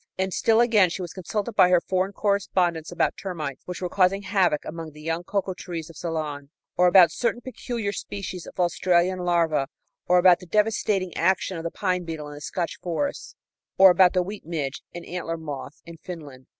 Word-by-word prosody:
And 190 0 -1
still 225 0 +3
again, 215 -6 +4
she 180 +2 -4
was 175 - -7
consulted 205 +4 -3
by 185 -4 +5
her 180 -1 +5
foreign 185 +2 -1
correspondents 185 -5 0
about 175 - 0
termites, 155 -9 -5
which 180 +1 -6
were - - 0
causing 195 +2 +2
havoc 190 -7 +1
among 160 -1 -7
the 150 - -13
young 165 +2 -2
cocoa 195 0 -2
trees 170 -2 -7
of - - -19
Ceylon, 150 -4 -4 0.3
or 180 - +4
about 175 -2 +7
certain 235 +4 -1
peculiar 235 -4 -4
species 195 -3 -6
of - - -12
Australian 180 +1 +2
larvæ, 165 -5 +1 0.4
or 180 - +5
about 180 -1 +6
the 180 - -13
devastating 205 -2 0
action 185 +2 +1
of 165 - -5
the 170 - -2
pine 180 -1 -1
beetle 160 -3 -6
in - - -9
the 145 - -10
Scotch 170 +2 -4
forests, 180 - -3 0.4
or 190 -1 +9
about 180 0 +5
the 180 -1 +2
wheat 205 +3 -7
midge 150 -4 -4
and 175 - -8
antler 170 -2 -4
moth 150 -2 -8
in 170 0 -11
Finland. 145 -8 -10
180 Hz, 195 wpm, -25 LUFS, 165-190 Hz, 0.4 s, or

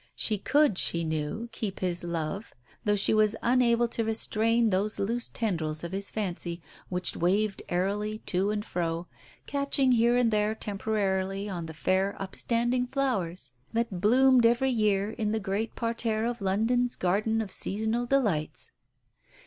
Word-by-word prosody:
She 215 -2 0
could, 285 -1 +3
she 170 0 +2
knew, 160 +8 -3
keep 215 -3 -4
his 175 -2 0
love, 170 +4 -4 0.3
though 210 -1 +3
she 200 - +3
was 215 0 +4
unable 240 -1 +3
to 230 - -1
restrain 225 +1 +1
those 200 +3 0
loose 235 +4 -1
tendrils 160 -8 -2
of 170 - -4
his 195 +1 -2
fancy 175 -4 -3 0.3
which 180 0 -1
waved 195 +4 +1
airily 205 +4 -1
to 190 +3 +1
and 210 0 -2
fro, 170 -2 -2 0.4
catching 280 -2 +1
here 240 0 +4
and 240 -2 +3
there 210 0 +1
temporarily 195 -2 -1
on 175 -5 -4
the 160 - -9
fair 190 +4 0
up 195 -1 -6
standing 240 +1 0
flowers 195 - -2 0.2
that 225 -6 -1
bloomed 255 +4 +5
every 240 +3 +3
year 210 -3 +1
in 215 -2 -2
the 220 - 0
great 205 +3 -2
parterre 230 -1 -1
of 235 -2 -3
London's 225 +6 +1
garden 210 +5 +1
of 215 -4 -3
seasonal 220 +4 0
delights. 210 - 0
210 Hz, 155 wpm, -28 LUFS, 190-230 Hz, 0.4 s, bloomed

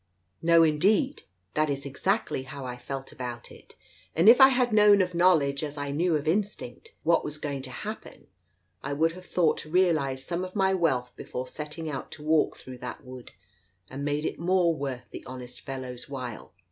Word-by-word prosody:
" 95 +1 -46
No 165 0 +8
indeed, 200 - +2 0.3
that 155 0 +1
is 140 -1 -2
exactly 185 +5 -1
how 135 0 -8
I 125 -1 -5
felt 135 +2 -7
about 120 -2 -7
it, - - -16 0.4
and 165 +5 +3
if 240 +4 +9
I 265 - +11
had 250 -3 +1
known 210 -1 +7
of 180 -1 +1
knowledge, 160 -5 +3
as 150 0 -5
I 145 0 -3
knew 165 +3 +1
of 150 0 -2
instinct, 205 - -2
what 170 0 +3
was 150 0 -5
going 145 -2 -4
to 130 - -7
happen, 125 - -8 0.6
I - - -3
would 160 +3 +2
have 185 +2 -12
thought 170 -4 +2
to 155 - -8
realize 155 -7 +2
some 175 +3 -2
of 185 +2 -7
my 190 -1 +3
wealth 135 -9 0
before 130 +1 -6
setting 150 +3 -6
out 140 -3 -5
to 150 - -10
walk 155 0 +2
through 130 -1 -10
that 125 - -7
wood, 125 -1 -11 0.6
and 135 +2 -5
made 145 +1 -1
it - - -3
more 175 0 +3
worth 135 -5 -5
the - - -8
honest 125 -1 -9
fellow's 130 -2 -7
while. 125 -5 -6
150 Hz, 195 wpm, -27 LUFS, 135-180 Hz, 0.6 s, I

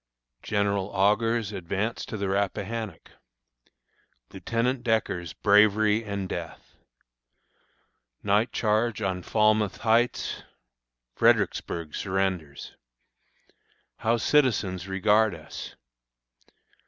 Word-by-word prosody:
General 100 -2 0
Augur's 105 +3 +1
Advance 100 +4 -3
to 110 - -5
the 100 -1 -2
Rappahannock. 100 0 -3 1.2
Lieutenant 120 +2 -1
Decker's 110 -7 -1
Bravery 105 +1 +4
and 100 -3 -4
Death. 85 -3 -7 1.5
Night 105 +4 +2
Charge 110 0 0
on 95 -1 -1
Falmouth 110 +1 +2
Heights. 115 +2 +1 0.7
Fredericksburg 85 -3 +1
Surrenders. 95 -7 -3 1.2
How 115 +1 +1
Citizens 105 - +1
regard 105 +1 +2
us. 80 - -9
105 Hz, 80 wpm, -26 LUFS, 95-110 Hz, 1.5 s, Bravery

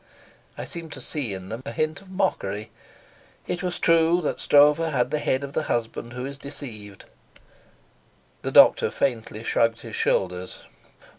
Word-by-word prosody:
I - - -4
seemed 165 -2 -8
to - - -8
see 135 -2 -3
in 95 -1 -7
them 115 +3 -5
a - - -5
hint 155 +8 -2
of 195 - -17
mockery; 110 - -2 0.7
it 180 - -3
was 180 -2 -2
true 165 +1 +4
that 150 - -2
Stroeve 145 +1 +6
had 140 -6 0
the 150 - 0
head 130 -1 0
of 140 0 -6
the - - 0
husband 120 0 -2
who 125 +1 -5
is 140 0 -7
deceived. 110 -9 -8 1.4
The - - -3
doctor - - +7
faintly 115 -4 -2
shrugged 115 -1 +1
his 115 -2 -7
shoulders. 90 -1 -1
135 Hz, 160 wpm, -25 LUFS, 115-155 Hz, 1.4 s, doctor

